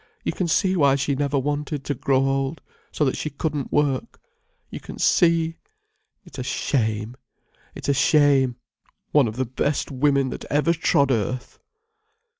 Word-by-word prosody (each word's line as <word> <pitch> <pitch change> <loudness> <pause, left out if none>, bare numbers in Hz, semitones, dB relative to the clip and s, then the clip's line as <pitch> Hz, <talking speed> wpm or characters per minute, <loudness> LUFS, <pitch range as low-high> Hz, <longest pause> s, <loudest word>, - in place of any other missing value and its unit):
You - - -1
can 180 - -2
see 190 +3 +2
why 140 -5 +4
she 140 +1 0
never 140 +1 0
wanted 145 +1 -2
to 145 - -2
grow 135 0 +1
old, 135 +3 -1 0.3
so 150 - 0
that 130 - 0
she 155 - -3
couldn't 145 -1 -3
work. 145 - 0 0.5
You - - -6
can - - -10
see. 165 -2 +2 0.7
It's - - -11
a - - -2
shame, 110 -3 -1 0.6
it's - - -7
a 140 - +3
shame, 140 -3 +3 0.6
one 145 -5 +4
of 110 - -5
the 130 +1 -1
best 135 +5 -2
women 140 -1 +1
that - - -7
ever 150 +3 +1
trod 140 -4 +2
earth." 125 +2 -2
140 Hz, 160 wpm, -23 LUFS, 130-150 Hz, 0.7 s, why